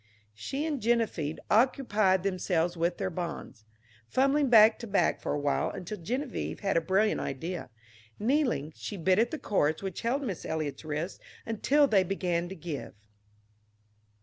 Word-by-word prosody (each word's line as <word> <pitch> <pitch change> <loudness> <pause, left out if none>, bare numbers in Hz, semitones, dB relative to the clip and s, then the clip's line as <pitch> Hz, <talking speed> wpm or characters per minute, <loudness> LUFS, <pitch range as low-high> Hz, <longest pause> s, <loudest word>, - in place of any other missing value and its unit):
She 270 - -4
and 295 -5 -2
Geneviève 220 -10 0
occupied 215 -6 +3
themselves 180 -3 0
with 170 +1 0
their 190 -2 -2
bonds, 165 -9 -6 0.4
fumbling 275 - +2
back 220 -1 +7
to 235 - -7
back 200 -1 +1
for - - -2
a 145 - 0
while, 145 0 0
until 195 +3 -6
Geneviève 250 - -3
had 195 -2 0
a 165 - +4
brilliant 195 +5 +2
idea. 165 +4 -4 0.5
Kneeling, 235 - 0
she 205 - -6
bit 185 +3 +3
at 235 +1 +3
the 315 - -4
cords 160 - 0
which 190 -2 -4
held 255 +5 0
Miss 195 - -4
Eliot's 155 -3 -3
wrists 155 +4 -4 0.3
until 270 +6 +3
they 205 -8 +4
began 175 -2 -1
to 190 - -7
give. 160 - -6
190 Hz, 155 wpm, -29 LUFS, 165-230 Hz, 0.5 s, back